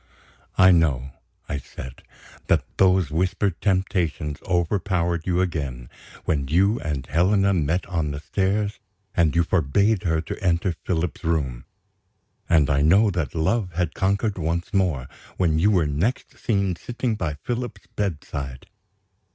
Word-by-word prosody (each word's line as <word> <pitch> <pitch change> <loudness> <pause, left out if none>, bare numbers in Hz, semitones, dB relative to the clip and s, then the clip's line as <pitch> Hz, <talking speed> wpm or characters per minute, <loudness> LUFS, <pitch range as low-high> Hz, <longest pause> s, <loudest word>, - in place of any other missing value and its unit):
"I 95 0 +7
know," 70 -7 +2 0.4
I 75 - -2
said, 65 -1 -10 0.5
"that - - +2
those 95 -5 +4
whispered 90 +2 0
temptations 90 -6 0
overpowered 85 -1 0
you 90 0 +2
again, 70 -9 -3 0.3
when 70 -4 0
you 95 - +3
and 70 -4 -3
Helena 95 +6 +3
met 85 +1 0
on 85 -6 -1
the 70 0 -4
stairs, 100 +5 -1 0.4
and 85 -2 +3
you 85 - +4
forbade 95 +6 +2
her 80 -2 +1
to 80 - -6
enter 90 0 +1
Philip's 85 -1 -2
room. 70 -7 -1 0.8
And 80 -4 +5
I 70 -1 +2
know 100 +8 +5
that 85 -8 -3
love 90 +3 0
had 85 -1 -1
conquered 100 +1 0
once 85 +3 -2
more, 90 -10 +1 0.3
when 80 -4 +2
you 100 +6 +4
were 90 -6 +3
next 80 - -1
seen 100 -5 0
sitting 120 +5 -3
by 85 -8 -2
Philip's 120 +10 -5
bedside. 70 -9 -4
85 Hz, 140 wpm, -24 LUFS, 75-95 Hz, 0.8 s, I